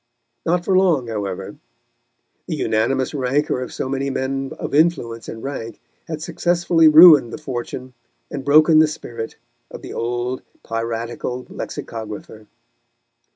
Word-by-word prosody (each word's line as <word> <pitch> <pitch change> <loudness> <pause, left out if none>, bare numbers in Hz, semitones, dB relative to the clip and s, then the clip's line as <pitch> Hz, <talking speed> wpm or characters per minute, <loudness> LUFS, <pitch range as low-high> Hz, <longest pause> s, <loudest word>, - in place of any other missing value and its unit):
Not 175 +1 +1
for 190 - +2
long, 165 -10 +3
however; 100 -4 -4 0.9
the - - -2
unanimous 130 +5 0
rancour 135 0 0
of 125 - -5
so - - -4
many 135 +1 -2
men 135 0 -2
of - - -5
influence 145 -8 +1
and 115 - -8
rank 130 -5 -6 0.3
had 160 -1 -5
successfully 170 -1 +2
ruined 155 -6 +8
the - - -5
fortune 130 -3 -6 0.4
and 140 -2 -5
broken 155 +3 +6
the 155 - +6
spirit 120 -7 -7 0.3
of - - -10
the - - -7
old 120 +2 -2 0.2
piratical 115 +2 -4
lexicographer. 110 -1 -7
130 Hz, 130 wpm, -21 LUFS, 115-155 Hz, 0.9 s, ruined